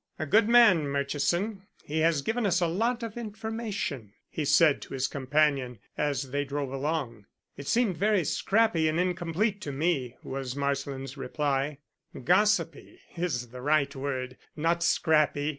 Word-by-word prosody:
"A 155 - -3
good 210 +8 +3
man, 220 -11 +6
Murchison; 170 +9 -1 0.2
he 155 +2 -3
has 160 -3 +2
given 225 - 0
us 180 -3 +2
a 175 - +2
lot 230 +8 0
of 230 0 -6
information," 215 - -4 0.2
he 155 - -3
said 145 +1 +4
to - - -7
his 130 0 0
companion 140 -2 0 0.2
as 140 -3 -2
they 145 +1 0
drove 140 -1 -4
along. 135 -7 -3 0.3
"It 140 - -9
seemed 225 -8 +1
very 205 -1 +2
scrappy 195 0 +2
and 155 +2 0
incomplete 180 +3 -1
to 145 - -4
me," 135 -4 -1
was 130 -1 -5
Marsland's 140 -1 -3
reply. 140 +1 -1 0.5
"Gossipy 180 - +1 0.2
is 145 -9 -2
the 125 +1 -9
right 140 0 +1
word 130 -2 -4 0.2
not 165 +2 0
scrappy. 155 -3 +2
155 Hz, 150 wpm, -28 LUFS, 140-185 Hz, 0.5 s, man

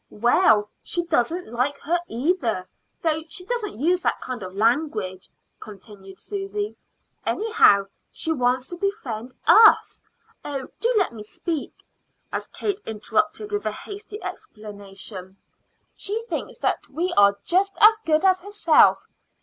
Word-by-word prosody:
"Well; 210 -1 +3
she 345 - -3
doesn't 330 -1 -1
like 265 +4 0
her 345 +4 0
either, 240 - -1 0.4
though 320 -1 +1
she 360 +3 -8
doesn't 430 - -3
use 350 +6 +2
that - - 0
kind 255 -3 -6
of 185 0 -8
language," 215 -5 0 0.3
continued 195 -2 -12
Susy. 410 +1 -4 0.5
"Anyhow, 435 - +4 0.2
she 320 - -3
wants 255 -2 +1
to 350 - -7
befriend 260 - -4
us 445 0 +6 0.4
Oh, 275 -3 -5
do 475 +1 +1
let 375 - +1
me 220 - -9
speak!" 295 +9 -5 0.5
as - - -3
Kate 405 0 -3
interrupted 320 - -1
with 415 0 -2
a - - 0
hasty 415 +1 -9
exclamation. 200 -2 -9 0.6
"She 435 +3 -3
thinks - - -5
that - - -1
we 340 +6 -2
are 200 0 +5
just 390 +3 +1
as 435 +1 +7
good 315 -4 +1
as 370 -1 +4
herself. 390 -5 +4
310 Hz, 135 wpm, -24 LUFS, -, 0.6 s, as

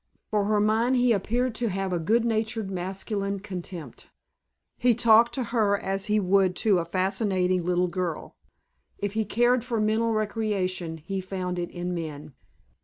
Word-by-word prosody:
For 210 -2 +1
her 210 0 +2
mind 220 +4 +2
he 245 -1 +3
appeared 235 +4 0
to 235 +1 -2
have 195 -1 -2
a 175 - 0
good 225 +8 +2
natured 220 -2 -1
masculine 195 +2 -3
contempt. 180 - -8 0.7
He 245 -1 +3
talked 230 0 +5
to 260 - -1
her 210 -4 +3
as 195 0 -2
he 210 0 +2
would 190 -1 +2
to 200 -4 +4
a 170 - -2
fascinating 185 0 0
little 180 +1 +1
girl. 175 -2 -4 0.6
If 205 -1 -3
he 220 0 0
cared 240 +3 +2
for 240 -3 -2
mental 220 +2 +1
recreation 205 -6 -1
he 190 +5 -4
found 185 -1 -4
it 175 0 -3
in 175 0 -4
men. 155 -4 -6
200 Hz, 165 wpm, -26 LUFS, 180-220 Hz, 0.7 s, talked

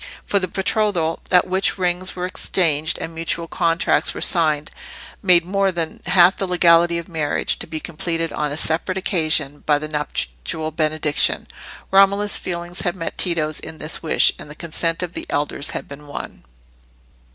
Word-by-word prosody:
For 200 - +2
the 185 - -2
betrothal, 190 -4 0
at 180 -1 +5
which 190 +2 0
rings 180 0 -1
were 180 0 -3
exchanged 165 -4 0
and 165 - -6
mutual 165 +1 -2
contracts 165 0 +1
were - - -5
signed, 155 -4 +1 0.5
made 180 -4 +5
more 195 +1 +1
than 165 -3 -3
half 180 0 +6
the 195 - -2
legality 170 -1 +4
of 170 - -6
marriage, 160 -4 -1
to - - -6
be 160 -1 -5
completed 165 0 -2
on 150 -1 -2
a 145 - -3
separate 165 +4 +2
occasion 155 -6 +1
by 150 -1 +4
the 155 +1 -5
nuptial 150 - -3
benediction. 155 -1 0 0.5
Romola's 200 +1 +4
feeling 175 0 -5
had 175 -1 0
met 165 -3 -4
Tito's 155 -4 0
in 160 - -8
this 155 +1 -2
wish, 160 - +3
and - - -9
the 150 - -9
consent 165 +1 -1
of 175 -1 -5
the - - -6
elders 145 +1 -1
had - - -5
been 145 +1 -11
won. 145 - -8
165 Hz, 170 wpm, -21 LUFS, 155-180 Hz, 0.5 s, half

